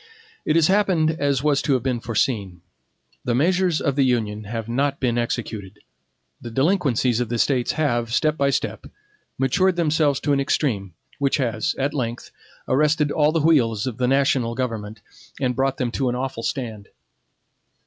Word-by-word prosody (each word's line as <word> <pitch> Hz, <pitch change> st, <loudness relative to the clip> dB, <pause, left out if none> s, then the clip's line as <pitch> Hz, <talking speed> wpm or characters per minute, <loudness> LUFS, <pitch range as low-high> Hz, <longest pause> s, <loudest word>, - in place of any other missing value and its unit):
It 155 Hz, -, +1 dB
has 165 Hz, -2 st, +5 dB
happened 185 Hz, -4 st, +3 dB
as 140 Hz, -4 st, 0 dB
was 145 Hz, -2 st, +2 dB
to 140 Hz, -, +1 dB
have 125 Hz, -3 st, 0 dB
been 130 Hz, -3 st, -1 dB
foreseen. 110 Hz, -6 st, -1 dB, 0.6 s
The 120 Hz, -, 0 dB
measures 180 Hz, +3 st, +2 dB
of 140 Hz, -3 st, -1 dB
the 140 Hz, -, +2 dB
Union 110 Hz, -4 st, 0 dB
have 115 Hz, +1 st, -5 dB
not 140 Hz, +4 st, 0 dB
been 120 Hz, -3 st, 0 dB
executed; 105 Hz, -4 st, -4 dB, 0.6 s
the 120 Hz, -, -7 dB
delinquencies 130 Hz, -, +1 dB
of 120 Hz, -2 st, -2 dB
the 120 Hz, -, -1 dB
States 125 Hz, 0 st, +1 dB
have, 120 Hz, -7 st, 0 dB
step 155 Hz, +5 st, +2 dB
by 140 Hz, -2 st, +1 dB
step, -, -, -2 dB, 0.5 s
matured 180 Hz, +8 st, +2 dB
themselves 155 Hz, -4 st, +2 dB
to 145 Hz, -, +1 dB
an 140 Hz, -, +2 dB
extreme, 110 Hz, -, -1 dB, 0.2 s
which 140 Hz, 0 st, +1 dB
has, 130 Hz, +4 st, -1 dB
at 140 Hz, +2 st, -1 dB
length, 120 Hz, -4 st, -4 dB, 0.4 s
arrested 150 Hz, +2 st, +2 dB
all 150 Hz, 0 st, +3 dB
the 165 Hz, 0 st, +1 dB
wheels 120 Hz, -10 st, +2 dB
of 125 Hz, -3 st, -5 dB
the 125 Hz, -, +2 dB
national 135 Hz, -3 st, +2 dB
government, 110 Hz, -4 st, -4 dB, 0.4 s
and 125 Hz, -3 st, 0 dB
brought 135 Hz, +1 st, 0 dB
them 125 Hz, -2 st, -1 dB
to 130 Hz, +1 st, -1 dB
an 120 Hz, -, -2 dB
awful 125 Hz, -2 st, -3 dB
stand. 115 Hz, -5 st, -4 dB
130 Hz, 170 wpm, -22 LUFS, 115-150 Hz, 0.6 s, has